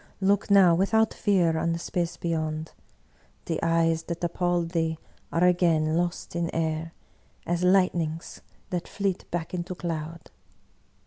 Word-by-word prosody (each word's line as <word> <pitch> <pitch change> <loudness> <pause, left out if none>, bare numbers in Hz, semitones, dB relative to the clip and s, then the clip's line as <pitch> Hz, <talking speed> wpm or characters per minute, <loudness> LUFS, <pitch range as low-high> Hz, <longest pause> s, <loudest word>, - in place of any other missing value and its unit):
Look 200 +1 +2
now 195 -4 +7
without 220 +5 +2
fear 175 -7 +2
on 165 +1 0
the - - -2
space 170 0 -3
beyond; 155 -2 -2 0.7
the 165 - -2
eyes 165 -1 +2
that 170 0 -5
ap 170 -1 -1
palled 175 -2 0
thee 165 -2 -1 0.3
are 165 - +1
again 170 -3 +3
lost 175 0 -2
in 170 -1 -1
air, 160 0 -1 0.5
as 175 0 -1
lightnings 175 -4 +1 0.3
that 175 -2 -2
fleet 195 -2 -2
back 170 0 -4
into 180 +1 -4
cloud." 165 -1 -5
170 Hz, 140 wpm, -26 LUFS, 165-180 Hz, 0.7 s, now